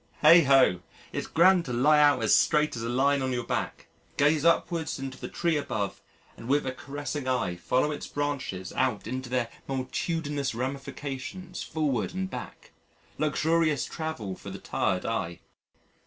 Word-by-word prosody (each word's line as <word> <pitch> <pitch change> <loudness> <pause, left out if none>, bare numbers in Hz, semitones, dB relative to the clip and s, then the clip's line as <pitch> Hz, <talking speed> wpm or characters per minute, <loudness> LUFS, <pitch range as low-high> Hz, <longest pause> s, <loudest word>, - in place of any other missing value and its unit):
Heigh 170 +1 +9
ho! 130 -10 +5 0.3
it's - - -4
grand 180 +1 +5
to 125 - -4
lie 150 +5 +4
out 145 -1 +5
as - - +5
straight 150 -2 +3
as 115 - -5
a 115 - -3
line 135 +3 +2
on 130 0 -1
your 120 -1 -1
back, - - -3 0.3
gaze 150 +1 +3
upwards 165 -1 +1
into 135 -1 -6
the - - -5
tree 170 -2 0
above, 105 -8 -3 0.3
and 115 - -10
with 145 +2 +2
a 130 - -1
caressing 140 +1 -5
eye 125 -9 0
follow 130 +11 0
its 145 - -5
branches 140 -11 -3
out 125 -6 0
into 130 +2 -4
their 125 -2 0 0.2
multitudinous 140 +1 -2
ramifications 135 +6 -5
forward 150 -2 -1
and 190 0 -3
back - - -8 0.5
luxurious 155 0 +1
travel 155 - -5
for - - -10
the - - -6
tired 90 0 -1
eye. 95 -7 -2
140 Hz, 160 wpm, -28 LUFS, 125-155 Hz, 0.5 s, Heigh